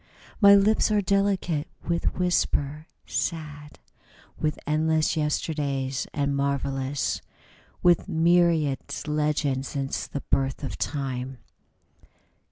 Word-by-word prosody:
My 200 -1 +9
lips 210 +3 +3
are 210 -1 +3
delicate 195 -6 +1 0.2
with 170 0 0
whisper, 155 -4 0 0.2
sad 150 -3 -4 0.6
With 155 -1 0
endless 155 +1 +1
yesterdays, 145 -3 -1
and 140 -1 -1
marvellous 140 0 -1 0.6
With 175 -1 +4
myriad 165 -4 +3 0.3
legends 150 -3 0
since 135 -1 -3
the 140 - -5
birth 135 +1 -1
of 140 - -5
Time. 130 -2 -3
150 Hz, 95 wpm, -26 LUFS, 140-170 Hz, 0.6 s, My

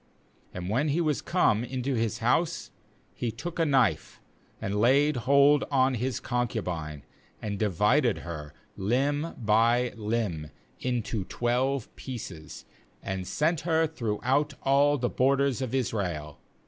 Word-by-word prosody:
29And 90 -1 -5
when 130 +7 +1
he 150 +3 +1
was 155 -4 +1
come 120 - +2
into 130 +2 -2
his 115 -3 0
house, - - +1 0.4
he 120 - -3
took 145 +10 -6
a 165 - +3
knife, 135 -4 +1 0.4
and 100 +1 -2
laid 140 +5 +4
hold 140 +4 +4
on 135 -2 +3
his 125 +2 -2
concubine, 90 - -3 0.4
and 100 -2 -4
divided 105 - +2
her, 75 -4 -6 0.2
limb 140 +10 0
by 115 +2 +2
limb, 105 -8 -2 0.3
into 120 -4 -2
twelve 125 +3 -1
pieces, 95 - -8 0.4
and 95 -1 -4
sent 160 +2 +1
her 160 -1 +2
throughout 140 +1 -1
all 145 +2 +4
the 120 -2 0
borders 135 +1 +1
of 130 0 -2
Israel. 90 - -2
125 Hz, 130 wpm, -28 LUFS, 105-140 Hz, 0.4 s, laid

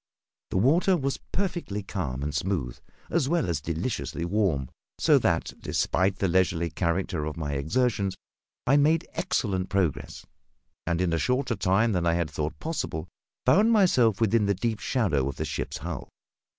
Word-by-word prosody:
The - - -1
water 165 - +4
was 135 -3 -2
perfectly 175 - -2
calm 70 -10 -3
and 75 0 -2
smooth, 75 -5 -2 0.3
as 155 -5 +1
well 170 - +1
as 85 -4 -1
deliciously 85 - -3
warm; 85 -8 +1 0.3
so - - +5
that, - - 0
despite 95 +1 +1
the 95 - +1
leisurely 85 -2 +1
character 85 -2 -1
of 75 +1 -5
my 75 -3 -3
exertions, 100 - 0 0.5
I 135 +3 +4
made 155 +3 +3
excellent 100 - -1
progress, 95 -7 -1 0.6
and, 85 0 +1
in 90 -2 +1
a 85 - +1
shorter 125 +1 0
time 100 +4 +2
than 90 -3 0
I 85 - +3
had 85 -2 -1
thought 75 +1 -3
possible, 115 - -3 0.4
found 215 +4 +5
myself 130 - +4
within 110 -1 +3
the 100 - +2
deep 110 +2 -2
shadow 80 - +1
of 70 - -5
the - - -3
ship's - - -4
hull. - - -6
95 Hz, 165 wpm, -27 LUFS, 85-125 Hz, 0.6 s, so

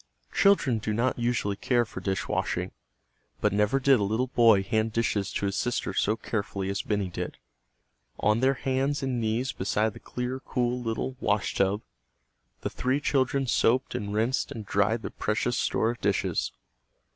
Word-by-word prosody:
Children 155 - +4
do 105 0 -2
not 120 +3 0
usually 120 -4 0
care 120 +3 +1
for - - -8
dishwashing. 95 -2 -1 0.7
But - - +1
never 105 +6 +2
did 135 -2 +5
a - - +1
little 110 +5 +1
boy 115 -5 +5
hand 110 +1 0
dishes 105 -3 0
to - - -1
his 100 0 -1
sister 120 +3 -1
so 105 - +2
carefully 100 -4 -3
as 100 - -1
Benny 105 -2 -1
did. 85 - -5 0.8
On 105 +2 +3
their 135 +2 +3
hands 135 +2 -1
and 125 -3 -1
knees 115 +4 0
beside 105 0 0
the - - -11
clear, 125 +1 -4
cool 125 -1 -1
little 120 +3 -3
"washtub," 105 -1 +1 0.8
the - - -2
three 130 +3 0
children 135 -1 +1
soaped 125 +1 +2
and 100 0 -3
rinsed 115 +5 0
and 110 -2 -6
dried 105 +3 +1
their - - -4
precious 115 +3 -1
store 115 -1 +1
of 120 - -9
dishes. 100 -1 0
115 Hz, 165 wpm, -27 LUFS, 105-130 Hz, 0.8 s, did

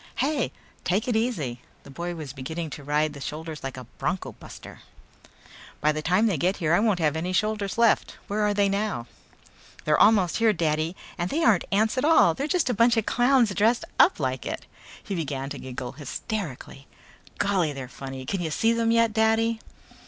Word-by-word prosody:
"Hey, 275 0 0 0.3
take 200 +7 0
it 245 - 0
easy!" 160 - -1 0.2
The 140 - -13
boy 170 +4 -4
was 150 -5 -7
beginning 155 +4 -5
to 145 - -8
ride 150 +1 0
the 140 - -10
shoulders 155 +1 -6
like 135 -1 -5
a 130 - -7 0.2
bronco 175 -7 -2
buster. - - -12 1.0
"By 150 - +3
the 155 0 -3
time 185 +7 +2
they 200 -7 +1
get 185 +5 +1
here 165 -3 +1
I 175 - +5
won't 215 -3 +2
have 155 -3 +1
any 175 +3 -2
shoulders 210 0 -1
left. 230 -2 +2
Where 210 +1 -1
are 210 0 +2
they 200 0 +3
now?" 200 - -1 0.8
"They're 150 -1 +3
almost 205 -6 +4
here, 225 -2 +4
Daddy! 160 0 0 0.2
And 175 +1 -1
they 325 +3 0
aren't 210 -6 +4
ants 220 +5 +2
at - - -2
all. 305 - +5
They're 280 - -3
just 355 0 +1
a 250 - +1
bunch 230 +2 +4
of 220 - +1
clowns 245 -4 +3
dressed 225 +5 +2
up - - +5
like 130 -3 -2
it." - - -5 0.4
He 200 - -5
began 140 -5 -3
to 145 - -5
giggle 125 -1 -6
hysterically. 145 - -6 0.5
"Golly, 185 -6 +1
they're 135 -3 -6
funny. 135 0 -8
Can 190 +7 -2
you 165 - -2
see 225 +8 +2
them 230 0 +1
yet, 230 -1 +3
Daddy?" 225 +1 +2
180 Hz, 195 wpm, -26 LUFS, 150-220 Hz, 1.0 s, I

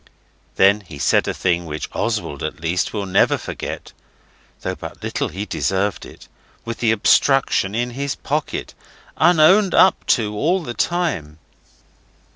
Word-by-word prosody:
Then 100 +2 +5
he 85 -6 -11
said 70 -1 +2
a - - 0
thing 85 -2 0
which 75 0 -5
Oswald 75 - -2
at 75 +3 -4
least 85 +2 -1
will 105 -2 -3
never 95 0 +3
forget - - -7 0.7
(though - - -3
but - - -10
little - - -2
he 95 +5 -5
deserved 100 0 -1
it, - - -15 0.4
with 115 0 -5
the 115 -2 +2
obstruction 110 -2 +2
in 120 +1 -1
his 140 +2 -3
pocket, 150 +1 -3 0.4
unowned 180 +4 +5
up 190 - +5
to 105 -3 -3
all 170 - +1
the 120 - -5
time). 135 - -2
105 Hz, 145 wpm, -20 LUFS, 90-145 Hz, 0.7 s, Then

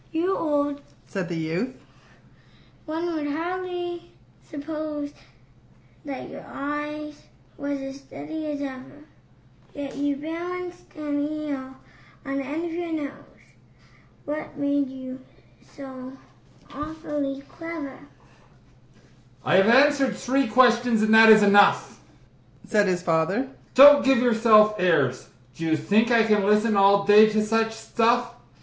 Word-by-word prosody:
"You 340 +4 0
are - - -4
old," 290 -2 -1 0.2
said 190 -3 -5
the 170 - -4
youth, 165 +10 -3 1.1
"one 330 +2 -3
would 305 -2 -3
hardly 350 +2 -5 0.4
suppose 300 -1 -6 0.9
That 275 -2 -6
your - - -10
eye 295 +1 -5 0.4
was 285 0 -4
as 270 0 -7
steady 315 +2 -8
as 290 -1 -4
ever; 270 +2 -9 0.7
Yet 285 -1 -6
you 285 0 -1
balanced 350 +4 -7
an 295 -2 -3
eel 290 -3 -4 0.5
on 275 0 -3
the 275 - -2
end 300 +5 -4
of 340 - -5
your 345 0 -4
nose 290 -3 -7 0.8
What 300 +1 -6
made 285 -1 0
you 260 0 -9 0.6
so 260 -2 -9 0.6
awfully 295 -2 -5
clever?" 330 -5 -8 1.5
"I - - +3
have 195 +1 +4
answered 270 +1 +4
three 270 +1 0
questions, 240 -1 +3
and 220 0 +2
that 225 0 +8
is 215 -1 +8
enough," 205 0 +4 0.7
Said 210 -2 +2
his 180 -1 -1
father. 180 +10 0 0.3
"Don't 285 +2 +9
give 270 -1 +3
yourself 225 -3 +4
airs! 145 -8 +1 0.3
Do 165 - -7
you 160 -1 +1
think 205 +9 +1
I 230 -2 +4
can 210 -2 +2
listen 210 +2 +2
all 200 0 +4
day 210 +1 +7
to 215 0 0
such 225 +1 0
stuff? 235 +2 0
270 Hz, 130 wpm, -24 LUFS, 220-295 Hz, 1.5 s, Don't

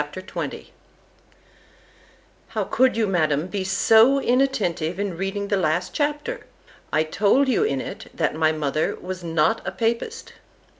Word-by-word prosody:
XX 185 +3 -6 1.8
——How - - -2
could 260 -3 +2
you, 225 - +2
Madam, 155 -6 +1
be 190 +1 -3
so 225 +7 +5
inattentive 215 -11 0
in 200 -3 -2
reading 195 +3 -3
the 200 - +2
last 175 +1 0
chapter? 295 +12 -2 0.4
I 155 - +2
told 205 - +2
you 265 - +2
in 435 - 0
it, - - -7
_That - - +1
my 155 0 +2
mother 155 0 -1
was 185 0 -6
not 165 +6 +1
a - - -3
papist. 235 - -2
195 Hz, 140 wpm, -23 LUFS, 165-240 Hz, 1.8 s, so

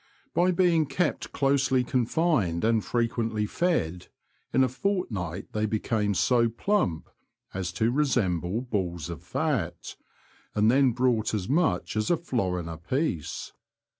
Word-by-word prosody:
By 180 +1 +3
being 170 -4 +3
kept 175 +2 -1
closely 135 -2 +2
confined 125 - +1
and 110 -2 +2
frequently 115 -2 -1
fed, 105 - -1 0.4
in 130 - +4
a - - +3
fort 180 - -1
night 90 -2 -4
they 110 0 0
became 105 -1 0
so 120 +3 +3
plump 115 - 0 0.5
as 95 -2 -3
to 110 +7 +1
resemble 110 - +1
balls 90 - -3
of 85 - -7
fat, - - -2 0.6
and 105 +2 +4
then 135 0 +4
brought 120 -3 +1
as 95 -4 -3
much 160 0 +1
as 110 0 0
a 175 - +3
florin 95 - -2
a 80 -1 -6
piece. 95 - -2
115 Hz, 135 wpm, -27 LUFS, 95-140 Hz, 0.6 s, in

